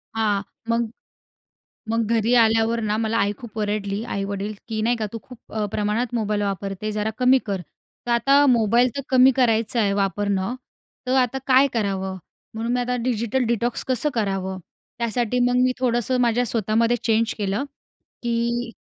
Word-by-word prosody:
हां. 210 -3 +1 0.3
मग, 230 -1 +1 1.0
मग 230 -1 +1
घरी 230 +2 +2
आल्यावर 225 0 +3
ना, 210 -1 0
मला 225 0 0
आई 200 +1 +2
खूप 225 -2 -9
ओरडली. 205 0 -2
आई-वडील 200 -1 -3
की 220 -1 -2
नाही 240 +2 +2
का, 215 -2 -2
तू 230 - -4
खूप 250 -3 -13 0.3
प्रमाणात 215 +4 -1
मोबाईल 210 -2 0
वापरते 195 +1 -3
जरा 210 +1 -1
कमी 255 +1 +5
कर. 195 -2 -2 0.5
तर - - -2
आता 275 +5 +4
मोबाईल 235 0 +4
तर - - -1
कमी 260 0 +6
करायचं 230 -2 +2
आहे, 200 -2 +2
वापरणं. 200 +2 0 0.5
तर 255 - 0
आता 255 +1 +2
काय 265 +1 +6
करावं 190 -4 -2 0.4
म्हणून 230 +2 -2
मी 250 - +1
आता 250 0 -1
डिजिटल 240 +1 0
डिटॉक्स 235 +1 -1
कसं 260 +4 +1
करावं? 195 -4 -2 0.4
त्यासाठी 235 +1 0
मग 245 - +1
मी 255 0 +3
थोडंसं 250 0 +1
माझ्या 240 0 +2
स्वतःमध्ये 230 +2 +1
चेंज 225 0 +2
केलं, 205 +5 -1 0.6
की 235 0 -1
230 Hz, 160 wpm, -23 LUFS, 210-245 Hz, 1.0 s, कमी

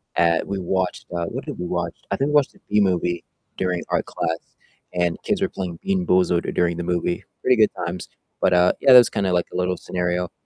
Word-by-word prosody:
at 85 -1 +2
we 100 -1 -3
watched, 95 0 -2
uh- 85 - -1
what - - -5
did - - -6
we 90 - -3
watch? - - -2 0.2
I - - +2
think 140 +2 0
we 150 - -2
watched 145 -2 +3
the - - -22
Bee 105 - +3
Movie 90 -2 0 0.3
during 90 -2 -1
art - - 0
class, 80 0 -2 0.5
and 90 -1 0
kids 205 -3 -1
were 195 - +1
playing 90 -3 -5
BeanBoozled 95 - +1
during 85 -1 +1
the 85 - -3
movie. 85 0 -1 0.2
Pretty 125 -1 +3
good 110 -1 +4
times, 85 +1 -5 0.3
but, 90 - +3
uh, 90 0 +5
yeah, 135 - +7
that - - +12
was 120 - +7
kinda 100 -4 0
like 90 - +1
a - - -3
little 90 0 0
scenario, 90 -1 -2
90 Hz, 225 wpm, -22 LUFS, 85-100 Hz, 0.5 s, that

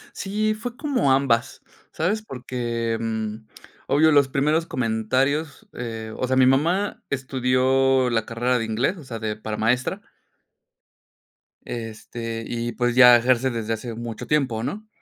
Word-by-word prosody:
Sí, 215 +2 -1
fue 235 +3 -7
como 265 - +1
ambas, 130 -4 +1 0.3
¿sabes? 205 +7 -1
Porque, 120 - -3
mm, 110 -1 -4 0.4
obvio, 155 +3 +4
los 145 -2 +5
primeros 150 +5 +1
comentarios, 130 - -1
eh, 115 -2 -6
o 130 - -2
sea, 130 - +1
mi 130 -1 +5
mamá 165 +10 +1
estudió 130 -1 +2
la 115 -2 +1
carrera 120 +2 0
de 115 - -2
inglés, 120 - 0
o 160 - -11
sea, 115 -3 -6
de 110 -1 -3
para 110 0 -5
maestra. 125 +4 0 1.6
Este, 115 0 -6
y 120 0 -3
pues 120 -1 0
ya 125 -2 +9
ejerce 130 +2 +2
desde 115 -2 -2
hace 115 +1 -5
mucho 115 -1 -6
tiempo, 130 -7 0
¿no?, 215 - -5
125 Hz, 145 wpm, -23 LUFS, 115-140 Hz, 1.6 s, ya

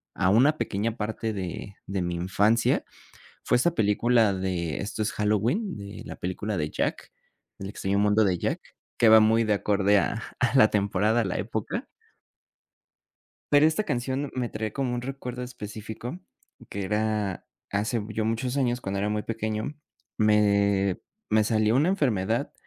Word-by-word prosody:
a 95 - +2
una 135 +10 +4
pequeña 110 +3 -2
parte 110 +1 -3
de 95 0 -5
de 95 0 -2
mi 85 0 -2
infancia 100 +6 +2 0.6
fue - - +3
esa 170 +8 +2
película 110 -1 +3
de 90 -5 -2
Esto 105 +2 -4
es 105 - 0
Halloween, 115 - 0
de 100 0 -8
la - - -8
película 100 +3 -3
de 75 -1 -1
Jack, - - -3 0.5
El 95 - -5
extraño 100 0 -2
mundo 105 +1 +4
de 90 -2 +1
Jack, - - -1 0.4
que 115 - +5
va 110 - +9
muy 110 +1 +4
de 105 - +2
acorde 100 0 +2
a 115 - -1 0.2
a 125 +2 +1
la 110 -5 +7
temporada, 105 +3 +1
a - - 0
la 95 - -2
época. - - -3 1.7
Pero 145 +1 +7
esta 160 +7 +2
canción, 130 - -2
me 125 -2 -1
trae 110 -1 -4
como 135 -3 -1
un 120 - -2
recuerdo 125 -1 -6
específico 115 - -7 0.5
que 100 - -4
era 105 -1 -1 0.2
hace 110 +3 -1
ya 110 +1 -2
muchos 125 +4 -1
años, 125 -2 0
cuando 100 0 -3
era 105 +1 0
muy 105 0 -1
pequeño, 110 +4 -3 0.4
me 100 -3 +3 0.3
me 110 0 +4
salió 110 +1 +2
una 150 +7 +3
enfermedad, 120 - 0
110 Hz, 160 wpm, -26 LUFS, 100-120 Hz, 1.7 s, va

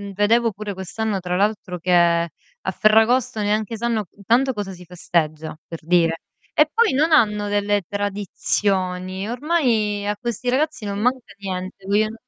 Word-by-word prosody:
vedevo 225 +3 +3
pure 205 0 -5
quest'anno 195 +2 -3
tra 180 0 -3
l'altro 200 -2 -1
che, 180 +2 -1
a 170 - +1
Ferragosto 220 +1 +3
neanche 215 +2 0
sanno, 225 -1 -1
intanto 235 +6 +1
cosa 205 -3 -4
si 180 -1 -11
festeggia, 160 -3 -2
per 165 - -7
dire. 165 0 +2 0.3
E 300 0 +4
poi 460 - +3
non 310 +5 +2
hanno 210 -7 +3
delle 205 0 +1
tradizioni, 195 -2 -1
ormai 240 -8 0
a 210 - 0
questi 240 +1 -3
ragazzi 280 -3 0
non 200 0 -3
manca 250 -2 -1
niente, 190 0 -6
vien 215 +2 +2
205 Hz, 145 wpm, -22 LUFS, 185-230 Hz, 0.3 s, E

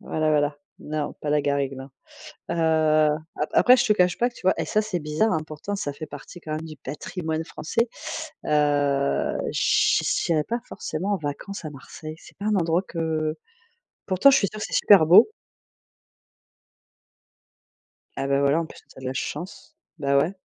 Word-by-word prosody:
voilà, 155 0 -1
voilà, 145 -1 +1 0.2
non 150 -1 -4
pas 150 - -3
la 150 0 +3
garrigue, 140 -1 0
non. 135 +1 -9 0.6
Heu, - - 0 0.8
après 150 - 0
après 250 +1 +7
je 245 -1 +2
te 215 - +5
cache 180 -3 +2
pas 240 - +3
que - - -26
tu - - -14
vois 190 - +4
et - - 0
ça 215 - +1
c'est 210 -4 -2
bizarre 155 +9 +1
hein, 160 - +1
pourtant 155 +7 -5
ça 145 -7 -3
fait 155 +2 -8
partie 145 +5 -11
quand 155 - -6
même 155 +1 -3
du 160 -1 -9
patrimoine 160 +4 -4
français. 230 +10 -2 0.6
Heu, 145 -2 +1
che - - +3
j'irais 160 -3 +1
pas 235 +6 -2
forcément 185 +6 -3
en - - 0
vacances 160 +6 -6
à 155 - -4
Marseille, 155 +3 -9
c'est - - -17
pas 200 - -4
un 215 - +2
endroit 170 0 +1
que 160 -3 -2 0.7
pourtant, 190 +9 +5
je 270 - +5
suis 200 - +1
sûre 215 - -9
que - - -2
c'est - - -7
super 195 -6 +6
beau. 175 - +8 2.9
Ah 135 - -1
beh 140 0 +3
voilà, 140 +3 +3
en - - -4
plus - - -14
tu - - -22
as - - -9
de - - -8
la 130 - -2
chance, 175 +8 -6 0.2
bah 140 -1 +2
ouais. 170 +8 +1
155 Hz, 190 wpm, -24 LUFS, 145-190 Hz, 2.9 s, beau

